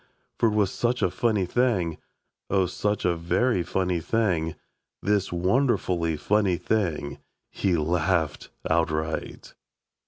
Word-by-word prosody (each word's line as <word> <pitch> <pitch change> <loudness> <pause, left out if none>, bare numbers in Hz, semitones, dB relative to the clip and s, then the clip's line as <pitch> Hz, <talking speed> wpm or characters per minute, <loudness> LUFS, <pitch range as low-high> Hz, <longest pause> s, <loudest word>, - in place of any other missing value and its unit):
For 115 - +4
it 105 - -2
was 105 -3 +2
such 120 +1 0
a - - +2
funny 110 -6 +1
thing, 95 -6 0 0.5
O, 95 -1 +3
such 105 +3 -2
a 90 -1 +2
very 90 +6 +1
funny 90 0 -1
thing, 85 -5 0 0.5
This 100 -2 +1
wonderfully 90 - +1
funny 100 +1 +2
thing, 75 -10 -1 0.3
He 95 -4 0
Laughed 80 0 0 0.2
Outright. 80 -1 -1
90 Hz, 120 wpm, -26 LUFS, 85-105 Hz, 0.5 s, For